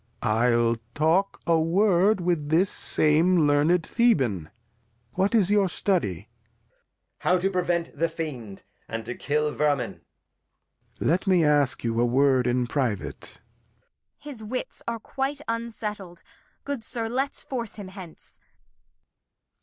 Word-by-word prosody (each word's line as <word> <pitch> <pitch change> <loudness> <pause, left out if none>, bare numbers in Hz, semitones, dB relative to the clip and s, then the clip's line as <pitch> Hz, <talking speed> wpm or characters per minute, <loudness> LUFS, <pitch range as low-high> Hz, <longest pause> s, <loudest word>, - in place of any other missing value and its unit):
Lear. - - +1
I'll 115 +1 +2 0.5
take 195 - -24
a 165 -1 +3
Word 190 +3 +3
with 170 -4 -1
this 170 +5 +3
same 160 +2 +3
learned 150 +4 +3
Thehan. 130 - +1 0.6
What 195 +4 +1
is 200 -3 +3
your 205 -2 +3
study? 165 - -1
Edg. - - -23 0.9
How 180 - +2
to 190 +2 0
prevent 175 -2 -1
the 165 0 0
Fiend, 130 -12 -7 0.2
and 115 0 -5
to 120 - -4
kill 150 +2 -1
Vermin. 145 -3 -1 1.0
Lear. - - -1
'Let 180 +6 +1
me 180 -4 +4
ask 145 -3 +2
you 115 0 0
a - - +4
Word 130 0 +3
in 125 0 +1
private. 120 -6 -2
Kent. - - -16
His 285 -6 -10
Wits 250 +4 -5
are 235 0 -2
quite 270 +5 -4
unsettled; 210 -6 -5 0.4
good 280 -5 -4
Sir, 230 0 -4
let's 265 +4 -2
force 235 -5 -5
him 200 -3 -8
hence. 185 -4 -13
170 Hz, 140 wpm, -25 LUFS, 140-205 Hz, 1.0 s, me